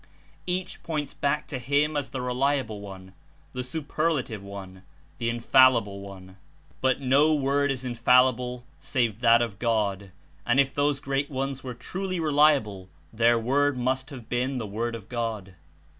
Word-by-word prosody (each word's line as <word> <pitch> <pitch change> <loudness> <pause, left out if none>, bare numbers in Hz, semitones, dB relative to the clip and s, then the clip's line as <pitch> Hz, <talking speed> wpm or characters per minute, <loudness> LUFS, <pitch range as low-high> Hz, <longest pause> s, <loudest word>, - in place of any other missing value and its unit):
Each 185 +1 -3
points 150 -4 -3
back 145 +1 -1
to 130 - -4
him 145 +4 +1
as 145 -2 -2
the 130 -2 -4
reliable 125 -4 -1
one, 95 -2 -10 0.4
the 125 - -3
superlative 150 - -2
one, 95 -2 -9 0.4
the 115 -1 0
infallible 115 -3 +4
one. 95 -1 -11 0.4
But 130 -1 +2
no 140 +4 +4
word 140 0 +1
is 130 -2 -3
infallible 125 0 +2 0.2
save 115 -5 -1
that 115 0 +5
of 105 -5 -6
God, 100 -5 -1 0.3
and 120 +8 +1
i6 - - +8
If 135 - -11
those 145 0 +1
great 140 +1 -1
ones 135 -1 -3
were 125 -2 -6
truly 185 +8 -4
reliable, 145 - +2 0.2
their 115 +1 +4
word 135 +4 +1
must 130 +2 -1
have 125 -6 -10
been 125 +2 -1
the 115 - -3
Word 115 +3 -3
of 110 -2 -10
God. 110 -6 -4
125 Hz, 160 wpm, -26 LUFS, 115-140 Hz, 0.4 s, i6